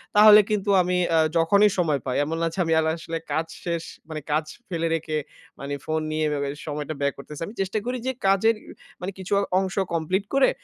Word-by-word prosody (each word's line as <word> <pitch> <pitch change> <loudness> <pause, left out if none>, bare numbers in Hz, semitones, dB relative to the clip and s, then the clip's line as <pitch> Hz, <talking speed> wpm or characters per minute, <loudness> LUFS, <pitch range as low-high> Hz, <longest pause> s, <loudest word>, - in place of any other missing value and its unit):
তাহলে 210 0 +9
কিন্তু 210 -1 -1
আমি 180 0 0
অ্যা 165 - +4 0.2
যখনই 200 +6 +5
সময় 155 -5 +2
পাই, 130 -1 -1
এমন 160 +3 -3
না? 165 - +2
যে, - - -6
আমি 165 - +1
এলা 160 0 +1
আসলে 165 0 -4 0.2
কাজ 160 +2 0 0.2
শেষ, 170 -1 -1 0.3
মানে 155 -1 -5
কাজ 155 +1 +1 0.2
ফেলে 165 -2 -1
রেখে 155 -1 -2 0.4
মানে 140 +1 -5
ফোন 155 0 -1
নিয়ে 155 0 0
এভাবে 140 -1 -1 0.2
সময়টা 150 0 -3
ব্যয় 140 0 +1
করতেসি। 145 +2 -9
আমি 215 - -10
চেষ্টা 195 +2 -1
করি 250 +1 -2
যে, - - +2 0.2
কাজের, 195 +4 +4 0.5
মানে 185 +2 -3
কিছু 190 +1 -3 0.3
অংশ 190 -1 -2 0.2
কমপ্লিট 170 +4 0
করে, 275 -1 +5
165 Hz, 205 wpm, -24 LUFS, 155-195 Hz, 0.5 s, তাহলে